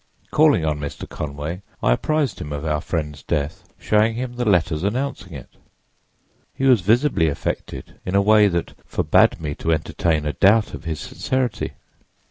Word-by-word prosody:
Calling 150 - +4
on 75 -1 -1
Mr. 75 -1 -6
Conway, 75 +5 -5 0.2
I - - +3
apprised 150 - 0
him 75 - -6
of 75 +1 -4
our 75 -1 0
friend's 75 -3 -4
death, 75 +1 -3
showing 110 +1 +2
him 125 +1 -4
the 120 -2 -1
letters 80 -4 +1
announcing 115 -3 -2
it. 70 -4 -9 1.1
He 135 - -1
was 125 -6 +5
visibly 110 - +3
affected 70 - -4
in 90 - -3
a - - +6
way 105 0 +6
that 85 -3 -2
forbade - - +3
me 75 -2 -3
to 80 - -2
entertain 80 0 0
a 75 - -1
doubt 105 - +3
of - - -8
his 80 -2 -3
sincerity. 130 -3 -2
85 Hz, 165 wpm, -22 LUFS, 75-115 Hz, 1.1 s, a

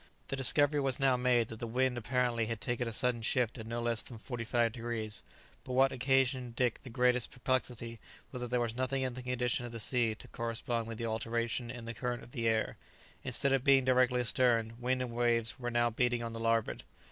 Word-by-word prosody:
The - - -1
discovery 145 +3 +5
was 135 -1 +1
now 135 -2 +4
made 125 -2 +2
that 110 - -8
the 120 - -4
wind 130 +2 +1
apparently 120 -1 0
had 115 -1 -3
taken 120 +2 -2
a - - -2
sudden 120 +1 0
shift 120 +1 0
of 110 - -7
no 115 +1 -3
less 120 -1 0
than 120 - -9
forty 120 +1 -5
five 120 0 +1
degrees; 115 -3 -3 0.4
but 130 - -6
what 135 +1 +4
occasioned 130 -1 +1
Dick 125 -2 0
the 130 - -10
greatest 125 0 +2
perplexity 125 -2 -2 0.3
was 125 - -5
that 125 - -2
there 125 0 +1
was 120 -1 -1
nothing 130 +1 -1
in 130 -1 -2
the 130 - -6
condition 125 0 -1
of 120 - -6
the 115 - -6
sea 115 -1 +1
to - - -12
correspond 115 0 -2
with 115 -1 -6
the 115 - -3
alteration 115 +2 -2
in 120 -1 -7
the 115 - -5
current 120 0 -3
of 120 - -14
the 115 -1 -1
air; 110 -1 +1 0.5
instead 140 -1 0
of 135 -2 +2
being 135 -1 +5
directly 125 -1 +3
astern, 115 -2 +2
wind 130 +1 0
and 125 - -5
waves 115 -1 +1
were 120 -1 -2
now 120 0 +2
beating 120 +1 +1
on 115 0 -4
the 115 - -5
larboard. 115 -1 +1
120 Hz, 225 wpm, -32 LUFS, 115-125 Hz, 0.5 s, discovery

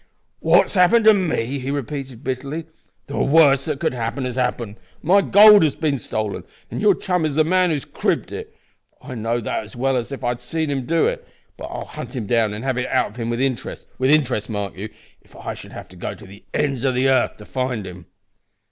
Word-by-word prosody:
"What 175 +4 +5
has - - -10
happened 215 +4 +4
to 220 - +9
me?" 140 - -1
he 130 +1 -5
repeated, 135 -2 -5
bitterly. 140 +5 -4 0.4
"The 140 - -4
worst 140 -2 +4
that 150 -3 -2
could - - 0
happen 120 +2 -3
has 125 - -3
happened. 120 -4 -2 0.3
My 190 +5 +5
gold 210 +1 +8
has 155 -3 +2
been 145 -4 -1
stolen, 110 -2 -3 0.3
and - - -4
your 205 -2 +5
chum 180 -3 -1
is 155 -3 -1
the 155 - +4
man 180 +2 +2
who 160 - +1
has 140 - -5
cribbed - - -1
it. - - -7 0.4
I - - -9
know 115 0 -1
that 110 - -2
as 110 - -13
well 135 +2 0
as 120 +1 -2
if 140 - -6
I 120 - +1
had 120 0 -3
seen 160 +4 -2
him 135 -3 -3
do 165 +2 +2
it. - - -2 0.3
But - - -8
I'll - - -6
hunt - - -8
him 120 -4 -3
down 115 -1 +2
and 110 - -7
have 130 -2 0
it 125 - -2
out - - +1
of 110 - -16
him 115 -1 -3
with 120 0 -2
interest; 130 -2 -2
with 130 +1 +2
interest, 135 -8 +2
mark 100 -3 -4
you 100 +4 -6 0.3
if - - -23
I - - -5
should - - -10
have - - -9
to 90 - -14
go 90 - -5
to 105 - -14
the 100 +2 -15
ends 140 -4 -1
o' 135 - +2
the 130 +1 +1
'arth 130 -2 +2
to 105 - -12
find 125 -5 -3
him." 90 -2 -10
130 Hz, 240 wpm, -21 LUFS, 115-155 Hz, 0.4 s, to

